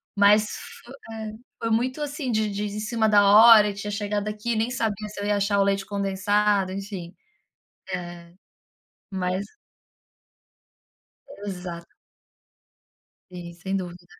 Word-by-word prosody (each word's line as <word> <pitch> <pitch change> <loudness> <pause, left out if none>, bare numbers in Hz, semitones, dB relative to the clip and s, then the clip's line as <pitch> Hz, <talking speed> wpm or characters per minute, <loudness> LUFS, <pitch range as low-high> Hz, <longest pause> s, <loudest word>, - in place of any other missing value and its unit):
Mas 205 +1 +6
f 240 - -10 0.2
é, 220 -1 -6 0.3
foi 230 - -1
muito 255 +6 0
assim 285 -3 -3
de 215 -1 +1
de 205 +1 -3
em 210 0 -4
cima 220 0 0
da 205 -1 +5
hora 215 0 +8
e 205 - -4
tinha 205 +1 -5
chegado 205 0 -2
aqui 215 +3 -2
e - - -2
nem 225 +3 0
sabia 215 -3 -2
se 205 -1 -8
eu - - -3
ia 205 - +2
achar 200 0 +1
o - - +5
leite 195 0 0
condensado, 200 0 +1
enfim. 195 -3 -6 0.8
Eh, 175 -1 -7 0.8
mas 185 0 -2 2.0
Exato. 180 -3 -6 1.4
Sim, 175 -1 -8
sem 190 +3 -3
dúvida, 175 -1 -6
205 Hz, 140 wpm, -25 LUFS, 190-215 Hz, 2.0 s, hora